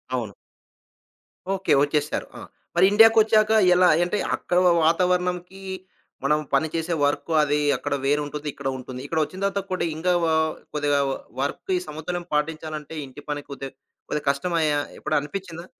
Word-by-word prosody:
అవును. 115 -5 -3 1.2
ఓకే. 190 -4 +1
వచ్చేసారు. 145 0 -1
ఆ! - - -10 0.3
మరి 180 +2 +6
ఇండియాకొచ్చాక 220 0 +6 0.2
ఎలా 180 0 +5 0.2
అంటే 180 +4 -1 0.2
అక్కడ 175 - -2 0.3
వాతావరణంకి, 180 +2 0 0.6
మనం 150 +2 +2
పని 140 +3 +3
చేసే 165 +1 -1
వర్క్ 145 +3 -1
అది 150 0 +1 0.2
అక్కడ - - -3
వేరు 145 +2 +2
ఉంటుంది. 150 +1 -6
ఇక్కడ 140 - -6
ఉంటుంది. 130 0 -8
ఇక్కడ 160 +3 -1
వచ్చిన 185 +5 -7
తర్వాత 200 0 0
కూడా 185 - 0
ఇంకా 180 +3 0
వ - - +2 0.5
కొద్దిగా 145 -1 +1
వ - - 0 0.3
వర్క్ 140 +6 -3
ఈ - - 0
సమతుల్యం 165 +3 -5
పాటించాలంటే 155 0 -3
ఇంటి 130 +2 -12
పని 145 0 -2
కొద్ది 135 -1 -6 0.4
కొద్దిగా 150 -1 -3
కష్టమాయా! 155 0 +1 0.2
ఎప్పుడనిపించిందా? 165 +3 -3
160 Hz, 145 wpm, -24 LUFS, 145-180 Hz, 1.2 s, మరి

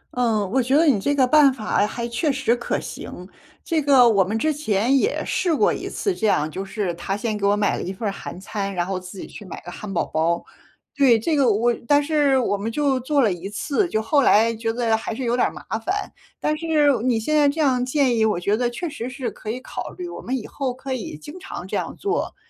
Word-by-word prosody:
嗯， 225 -5 +1
我 265 +2 +3
觉 260 +3 +1
得 325 - +4
你 265 -10 +4
这 285 +8 0
个 265 -2 +4
办 285 +1 +6
法 215 -4 0
还 235 +1 -4
确 285 +6 0
实 270 -4 +1
可 240 - -2
行。 180 - -8 0.4
这 325 -2 0
个 270 -4 +6
我 200 -4 +4
们 210 +5 -2
之 310 +6 +1
前 245 -3 +1
也 355 - +1
试 350 -4 0
过 420 - +3
一 - - -5
次 400 - -1
这 220 - 0
样， 155 -6 +2
就 190 +5 -4
是 195 -2 -3
他 195 +3 -3
先 215 0 -2
给 200 -1 0
我 205 +1 +3
买 205 -1 +1
了 - - -4
1 185 - -4
份 200 +3 -4
儿 200 - 0
韩 185 - -8
餐， 200 +1 -4
然 175 -1 0
后 190 0 -3
自 185 +1 -11
己 - - -6
去 - - -11
买 185 - -8
个 175 - -7
汉 200 +3 -7
堡 175 - 0
包， 165 +2 0 0.5
对， 270 -5 +5
这 305 +9 0
个 270 -5 +4
我 235 +4 +2
但 290 0 +4
是 285 -3 +2
我 240 -5 +1
们 215 +3 -3
就 275 0 +1
做 280 +3 +1
了 210 -5 +2
1 180 +3 -7
次， 295 - -1
就 220 -6 -1
后 285 +6 +3
来 230 -2 +4
觉 225 0 -2
得 230 -1 +1
还 220 0 -4
是 260 - -4
有 240 0 +1
点 245 - +3
儿 - - -5
麻 - - -11 0.2
烦。 385 - -3 0.3
但 305 - 0
是 310 -3 +3
你 240 -2 +1
现 305 +8 -1
在 290 -2 +5
这 305 - -4
样 260 -5 +2
建 255 -1 +2
议， 225 - +2
我 215 -5 +1
觉 200 +4 +1
得 240 +2 0
确 330 +9 -4
实 270 -5 -5
是 255 -1 -4
可 215 - -9
以 245 - -3
考 - - -6
虑， 360 -1 -5
我 345 - -8
们 260 +2 -2
以 225 - -7
后 270 -3 -3
可 265 +1 -5
以 225 -11 -5
经 295 - -10
常 380 - -7
这 - - -4
样 - - -3
做， 405 +3 -2
240 Hz, 275 characters per minute, -22 LUFS, 210-285 Hz, 0.5 s, 办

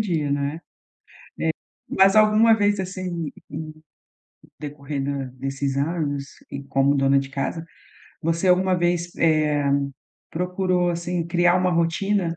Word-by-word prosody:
dia, 165 -9 0
né. 140 +2 -1 1.4
É, - - -3
mas 195 +1 +5
alguma 215 +1 +6
vez, 205 -1 +1
assim, 180 -4 -4 0.2
em 155 +1 -6 0.9
decorrer 145 -1 -5
da 140 0 -2
desses 135 +1 -2
anos 145 -1 -1 0.3
e 140 0 -5
como 135 +1 +2
dona 135 0 +3
de 135 0 -3
casa, 140 +4 -3 0.6
você 165 +3 0
alguma 185 +1 +4
vez, 175 0 0
eh, 155 -3 +2 0.7
procurou, 180 0 0
assim, 170 0 -2
criar 175 +1 +3
uma 185 0 +2
rotina 170 +1 0
165 Hz, 125 wpm, -23 LUFS, 145-180 Hz, 1.4 s, alguma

